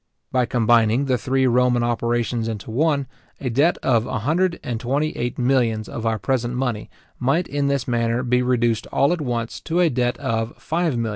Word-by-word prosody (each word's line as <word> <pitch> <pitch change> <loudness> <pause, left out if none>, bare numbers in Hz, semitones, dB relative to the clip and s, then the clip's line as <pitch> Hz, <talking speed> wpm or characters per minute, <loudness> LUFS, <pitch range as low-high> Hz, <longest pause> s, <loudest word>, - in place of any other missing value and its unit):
By 125 -2 +1
combining 115 +2 +3
the 130 -3 +1
three 130 +4 +1
Roman 125 -1 +3
operations 120 0 -1
into 110 -1 -5
one, 140 +2 +1 0.3
a 130 -3 -3
debt 145 +9 +3
of 120 -2 +2
a - - -2
hundred 170 +10 0
and 120 -2 -3
twenty 140 +6 0
eight 120 +1 -3
millions 120 -4 +1
of 115 -1 -4
our 110 -1 +1
present 120 +4 -1
money, 125 -4 -2 0.3
might 140 +8 +1
in 140 0 -1
this 140 -2 -1
manner 120 0 0
be 125 0 +2
reduced 120 -3 +1
all 140 +5 +2
at 175 - -3
once 120 -4 -3
to 170 +2 -2
a 175 -3 +4
debt 120 0 0
of 115 0 -2
£5,333,333:6:8. 135 -4 -1
125 Hz, 190 wpm, -22 LUFS, 115-135 Hz, 0.3 s, a